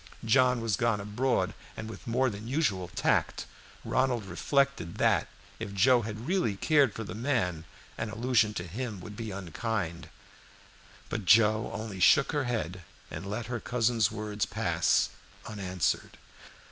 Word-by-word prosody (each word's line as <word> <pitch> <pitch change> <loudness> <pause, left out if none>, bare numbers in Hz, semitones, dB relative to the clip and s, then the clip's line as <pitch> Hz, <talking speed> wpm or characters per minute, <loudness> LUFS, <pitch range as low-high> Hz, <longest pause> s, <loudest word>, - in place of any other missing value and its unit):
John 125 +1 +4
was 110 -5 0
gone 115 -3 +1
abroad, 105 +6 0 0.2
and 110 - -5
with 110 0 -10
more 125 +2 +2
than 105 +2 -8
usual 120 - 0
tact, 85 - 0 0.4
Ronald 125 -5 +1
reflected 135 - 0
that, - - +3 0.3
if 105 -3 -5
Joe 120 +5 +5
had 110 +1 -6
really 175 - +1
cared 140 +1 +3
for 115 - -4
the - - -7
man, 105 - -1 0.3
an 110 - -2
allusion 110 -1 +1
to 90 - -3
him 105 +3 -5
would 105 +2 -9
be 115 -1 -5
unkind. 95 -2 -4 1.0
But 105 - -3
Joe 110 +3 +5
only 105 -1 -5
shook 140 +9 +5
her 145 -3 0
head, 95 -7 -3 0.3
and 85 +6 -6
let 105 +3 -3
her 120 0 -3
cousin's 115 -4 +1
words 105 +1 -3
pass 90 -7 +1 0.4
unanswered. 95 -5 -2
110 Hz, 145 wpm, -29 LUFS, 100-120 Hz, 1.0 s, Joe